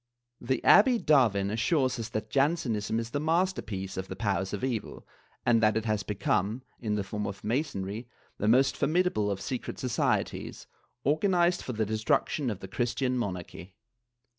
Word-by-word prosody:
The 125 +1 -1
Abbe 240 +4 +7
Davin 115 - +3
assures 130 +2 +1
us 115 0 -4
that 110 -1 -4
Jansenism 135 -7 +1
is 115 0 -5
the 145 - -1
masterpiece 150 - -1
of 95 0 -4
the 95 - -6
powers 95 -2 -1
of 105 - -4
evil 120 -5 -3 0.4
and 120 -2 +4
that 110 0 +3
it 110 - -2
has 105 -2 0
become, 105 +3 -1 0.2
in 105 -3 -1
the 105 - -1
form 105 +2 -4
of 100 -1 -7
Masonry, 110 -3 -2 0.3
the 105 - 0
most 130 +5 +4
formidable 155 - +1
of 100 -1 -2
secret 130 -3 -4
societies, 125 -3 -1 0.4
organized 175 +4 +2
for 125 - -5
the 110 -1 0
destruction 110 +5 0
of 105 -4 -5
the 95 - -7
Christian 125 +4 -1
Monarchy. 90 -4 -5
115 Hz, 165 wpm, -29 LUFS, 100-135 Hz, 0.4 s, Abbe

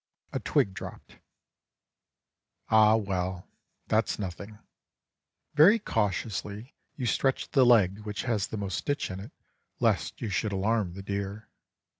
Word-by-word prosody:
A - - -1
twig 95 - +1
dropped. 100 - -10 1.5
Ah 110 0 +6
well! 95 -4 -2 0.4
that's 110 +1 +1
nothing. 100 +2 -6 1.0
Very 165 +9 +7
cautiously 105 - -2 0.2
you 130 - -3
stretch 135 +3 0
the 135 - +5
leg 105 -5 +5
which 105 -1 -5
has 110 -6 0
the 110 - -5
most 100 -3 -2
stitch 145 -7 -2
in 95 - -5
it 105 +8 -9 0.5
lest - - +1
you 115 - -3
should 100 +2 -1
alarm 100 -1 0
the 100 - -7
deer. 100 +2 -4
105 Hz, 130 wpm, -28 LUFS, 95-115 Hz, 1.5 s, Very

